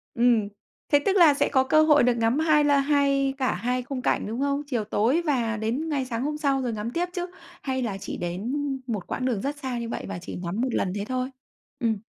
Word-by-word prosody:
Ừm, 235 -3 +3 0.4
thế 290 - +5
tức 395 - +2
là 325 -5 +7
sẽ 280 - +1
có 265 -2 +3
cơ 310 +4 +4
hội 300 -4 +5
được 245 - +4
ngắm 230 +5 +2
2 310 -2 +4
la 285 -1 +4
hai 275 -1 +2
cả 260 -2 +1
2 250 +1 -1
khung 255 +1 -5
cảnh, - - 0
đúng 230 +4 -4
không? 280 +1 0
Chiều 240 -6 -1
tối 225 +9 +1
và 245 -8 0
đến 240 +9 -2
ngay 275 -3 -1
sáng 240 0 -3
hôm 300 +1 -2
sau 275 -3 +1
rồi 245 -3 -2
ngắm 215 +2 -4
tiếp 345 +6 0
chứ? 355 -1 -3 0.3
Hay 260 -1 -2
là 210 -5 -2
chỉ 195 - -6
đến 180 +8 -3 0.4
một 210 -6 -3
quãng 255 - -3
đường 235 -6 0
rất 285 +2 -3
xa 260 -4 -4
như 235 -1 -4
vậy - - -4
và - - -5
chỉ - - -7
ngắm 180 +5 -3
1 260 - 0
lần 185 - 0
thế 200 0 -3
thôi? 255 +2 -2 0.5
Ừm. 225 -3 0
255 Hz, 245 wpm, -25 LUFS, 230-285 Hz, 0.5 s, là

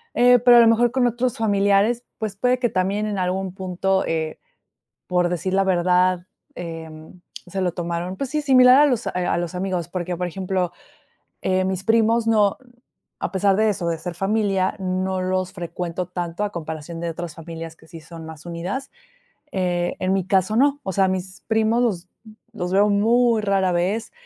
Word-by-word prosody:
eh, 245 0 +6
pero 245 +1 +7
a - - +9
lo 230 - +6
mejor 230 +1 +4
con 260 -1 +2
otros 240 +1 -1
familiares, 205 +2 +2
pues 215 -3 -4
puede 250 +3 +2
que 240 - +1
también 195 +2 0
en 205 -2 -2
algún 185 0 -2
punto, 190 0 -1
eh, 160 -1 -2 0.7
por 180 -1 +1
decir 180 +2 -2
la 195 0 +3
verdad, 180 0 +2 0.3
eh, 165 -2 -7 0.6
se 190 +2 -3
lo 180 -1 +1
tomaron, 175 +1 -4
pues 275 - -3
sí, 300 +2 -1
similar 255 -2 +7
a 295 - +7
los, 250 -3 0
eh, - - -1 0.2
a - - +1
los 175 0 -3
amigos, 180 -2 -2
porque, 180 0 -4
por 180 +1 -2
ejemplo, 185 0 -2 0.7
eh, 185 0 +1
mis 190 0 -2
primos 225 0 +2
no, 210 -3 +3 0.7
a - - -2
pesar 195 0 +2
de 220 0 +3
eso, 195 -4 -2
de 165 -1 -1
ser 175 +1 -6
familia, 195 0 0
no 185 0 -1
los 185 0 -1
frecuento 175 0 -4
tanto 175 +1 -4
a 205 - -2
comparación 160 -1 -6
de 170 - -2
otras 170 -1 -7
familias 165 0 -8
que 160 - -21
sí 165 -1 -11
son 165 0 -11
más 160 0 -11
unidas, 180 +11 -5 0.6
eh, 175 -2 -1
en 185 +1 0
mi 190 -2 0
caso, 190 +2 +1
no, 285 +3 +3
o 190 - -3
sea, 195 +1 +3
mis 185 0 -4
primos 220 +2 +2
los 185 -7 -1 0.4
los 180 -5 -4
veo 205 +2 +4
muy 230 +3 +3
rara 195 -3 +1
vez 190 +6 -1
190 Hz, 190 wpm, -22 LUFS, 175-215 Hz, 0.7 s, a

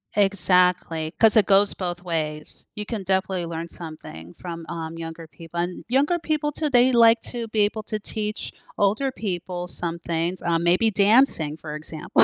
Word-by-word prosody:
Exactly, 180 -5 +2
'cause 220 -2 +5
it 210 - +6
goes 200 +1 +4
both 175 -2 -4
ways. 155 -3 -4
You 210 0 -5
can 215 -4 -4
definitely 190 -1 0
learn 165 0 -5
something 155 - -10
from, 170 -2 -7
um, 165 0 -6
younger 165 0 -7
people, 165 +1 -8
and 175 +1 -3
younger 285 +7 +2
people 305 -2 -1
too 300 +1 -2
they 245 +1 +6
like 230 -1 +6
to 235 -2 -5
be 220 - -1
able 210 +1 +1
to 215 0 -4
teach 210 0 -4 0.3
older 215 +7 +1
people 180 -6 -4
some 170 -1 -4
things, 170 +2 -2
uh, 170 -1 +1
maybe 175 +6 +3
dancing, 200 - +3
for 150 -1 -7
example. 155 +1 +1
180 Hz, 170 wpm, -24 LUFS, 165-215 Hz, 0.3 s, it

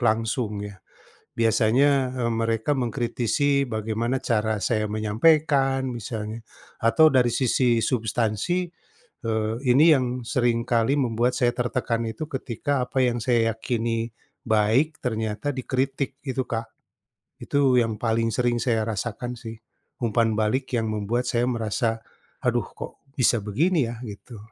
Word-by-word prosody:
langsung 110 -2 0
ya. 100 -2 -10 0.5
Biasanya, 125 +4 +3
eee, 125 -2 -1
mereka 115 +4 0
mengkritisi 125 +3 0
bagaimana 115 +2 -2
cara 110 -2 0
saya 110 -1 0
menyampaikan 135 +5 +2
misalnya, 110 -1 -5 0.3
atau 155 +8 +5
dari 125 -4 +3
sisi 125 -2 +2
substansi, 115 - 0 0.6
eee, 110 -1 0
ini 130 +5 +5
yang 125 -1 -2
sering 120 -1 +1
kali 115 +1 +1
membuat 125 -3 +1
saya 125 -1 +2
tertekan 120 -2 -1
itu, 115 +8 -5
ketika 130 0 -2
apa 130 - -1
yang 120 -1 +2
saya 115 -1 +2
yakini 115 0 -2 0.3
baik, 115 +7 +2
ternyata 110 +1 -2
dikritik, 135 +1 -2
itu, 130 -2 -3
Kak. 115 -1 -4 0.7
Itu 135 -3 +3
yang 110 -2 -2
paling 115 0 0
sering 120 +1 0
saya 115 -4 +1
rasakan 115 +2 -4
sih, 115 -2 -8 0.5
umpan 115 -1 +1
balik 110 +5 0
yang 115 - 0
membuat 110 +4 -1
saya 120 0 +1
merasa, 115 -1 -1 0.5
"Aduh, - - +2
kok - - -8 0.2
bisa 120 -3 +3
begini 140 - +1
ya?" 120 - -6
Gitu. 110 +2 -10
120 Hz, 130 wpm, -24 LUFS, 110-130 Hz, 0.7 s, atau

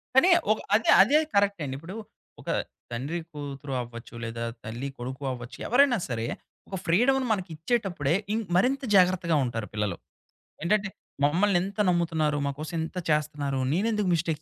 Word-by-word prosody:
కానీ 265 +8 +7 0.2
ఒక 215 - +2 0.2
అదే, 225 - +2
అదే 280 +8 +4 0.2
కరెక్ట్ 200 -2 +2
అండి. 135 -2 -3
ఇప్పుడు 165 +7 -9 0.5
ఒక - - -8 0.4
తండ్రి 140 +8 -3
కూతురు 140 -1 -6
అవ్వచ్చు, 115 0 -9
లేదా 115 0 -4 0.2
తల్లి 120 +5 -4
కొడుకు 130 +3 -6
అవ్వచ్చు, 120 0 -7
ఎవరైనా 250 0 +5
సరే 115 -1 -2 0.4
ఒక 195 - -4
ఫ్రీడమును 255 +10 +3
మనకి 190 -4 -1
ఇచ్చేటప్పుడే 170 - 0 0.2
ఇం 220 - +1 0.2
మరింత 270 +8 +2
జాగ్రత్తగా 180 -3 +4
ఉంటారు 115 -3 -3
పిల్లలు. 105 -1 -1 0.7
ఏంటంటే, 205 +3 +2 0.4
మమ్మల్ని 180 +6 +3
ఇంత 195 +2 -7
నమ్ముతున్నారు, 160 -4 +1
మా 140 - 0
కోసం 160 +2 -5
ఇంత 170 - -9
చేస్తన్నారు, 150 -3 0
నేనెందుకు 210 +1 +1
మిస్టేక్ 160 -2 -1
165 Hz, 150 wpm, -27 LUFS, 135-200 Hz, 0.7 s, కానీ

